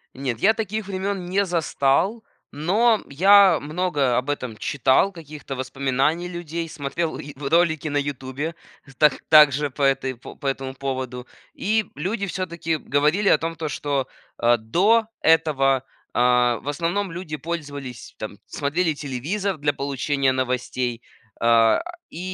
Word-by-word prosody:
Нет, 125 -4 -3
я 220 +2 +5
таких 215 -1 -3
времён 195 -1 -3
не 195 +3 +1
застал. 175 +5 +1 0.3
Но 210 +9 +2
я 190 +3 +6
многое 150 -5 0
об 125 +4 -1
этом 125 -6 -3
читал 130 - +2
каких-то 155 -5 -8
воспоминаний 135 +5 -1
людей, 170 -1 -5
смотрел 160 +2 -3
и 145 +1 -8
в 140 0 -5
ролике 160 -2 +2
на 145 - -1
"Ютубе" 145 +2 -3 0.5
так 150 -3 +4
также 145 -2 +6
по 145 - -8
этой 135 -1 +1
по 120 - -12
по 145 - -13
этому 135 -1 -2
поводу. 130 -2 -4 0.3
И 215 +1 0
люди 200 +7 -2
всё-таки 170 -4 -2
говорили 150 +8 +1
о - - +5
том, 165 0 -3
то, 160 -2 -4
что, 140 -2 -2 0.3
а, 120 0 +3
до 200 - +2
этого, 140 -5 +3 0.3
а, 125 -1 +3
в - - -14
основном, 170 +6 -1
люди 165 -3 -6
пользовались 145 -7 -6
там, 105 -2 -6
смотрели 160 +3 -1
телевизор 155 +8 -3
для 145 0 0
получения 140 0 0
новостей. 125 -2 -2 0.4
А, 115 -1 +4 0.3
и - - -8
145 Hz, 140 wpm, -23 LUFS, 130-175 Hz, 0.5 s, я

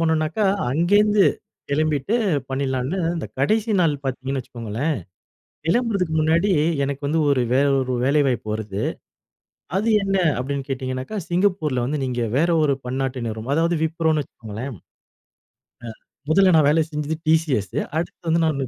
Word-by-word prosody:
பண்ணுனாக்கா 160 +4 +1 0.3
அங்கேந்து 205 +5 +4 0.5
கெளம்பிட்டு 155 - 0 0.3
பண்ணிடலாம்ன்னு, 135 +4 -1 0.2
இந்த 165 - -4
கடைசிநாள் 195 - +2
பார்த்தீங்கன்னு 135 +1 -2
வச்சுக்கோங்களேன். 120 +5 -3 0.7
கிளம்புறதுக்கு 200 -3 +1
முன்னாடி, 165 +6 +2 0.3
எனக்கு 140 +1 -3
வந்து 160 +3 +1
ஒரு 135 -3 +3
வேற 135 +2 +4
ஒரு 130 -1 -1
வேலைவாய்ப்பு 135 -5 +1
வருது. 105 -2 -4 1.0
"அது 215 +4 +1
என்ன?" 195 0 +1 0.2
அப்படின்னு 135 +1 -3
கேட்டிங்கனாக்கா, 130 +7 -4
சிங்கப்பூர்ல 175 -8 +1
வந்து 145 +2 -2
நீங்க 125 -2 -2 0.2
வேற 170 +3 +2
ஒரு 140 -2 +2
பன்னாட்டு 130 -1 -2
நிறுவனம். 110 +3 -4
அதாவது 165 +1 +2
விப்ரோன்னு 160 -2 +1
வச்சுக்கோங்களேன். 115 +3 -8
ஆ. - - -13 1.5
முதல்ல 185 +3 +5
நான் 155 -3 +5
வேலை 160 +2 +3
செஞ்சது 150 +1 -2
டிசிஸ்சு. 150 - +1 0.2
அடுத்து 170 0 -5
வந்து 165 +1 +3
நானு 140 -4 -1
150 Hz, 130 wpm, -22 LUFS, 130-170 Hz, 1.5 s, முதல்ல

